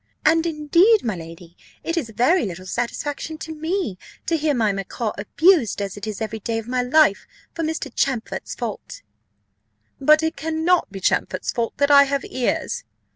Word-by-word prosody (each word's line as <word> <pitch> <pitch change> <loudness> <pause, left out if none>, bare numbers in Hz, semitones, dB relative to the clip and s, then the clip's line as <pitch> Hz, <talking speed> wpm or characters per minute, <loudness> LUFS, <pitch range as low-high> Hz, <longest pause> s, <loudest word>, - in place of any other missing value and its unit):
"And 325 +2 +4
indeed, 335 +8 +3
my 220 -4 -1
lady, 165 +1 -11 0.3
it 330 - -2
is 310 -10 -2
very 255 - +2
little 185 0 -8
satisfaction 280 +9 -3
to 320 0 -7
me, 315 - -3 0.3
to 335 - +1
hear 305 -2 +1
my 220 -4 +2
macaw 200 +3 -3
abused 280 - +3
as 200 -2 -4
it 205 +1 -7
is 215 +1 -5
every 220 0 -3
day 225 +2 -2
of 225 0 -5
my 250 0 0
life, 250 -4 +3 0.3
for 335 - -4
Mr. 320 -4 -3
Champfort's 255 -5 -2
fault." - - -6 1.0
"But 305 +3 +5
it 320 - -1
cannot 320 - +1
be 195 -1 -8
Champfort's - - 0
fault 235 -1 -3
that 285 0 +2
I 280 0 +8
have 280 0 -2
ears." 255 - -2
275 Hz, 175 wpm, -22 LUFS, 215-320 Hz, 1.0 s, I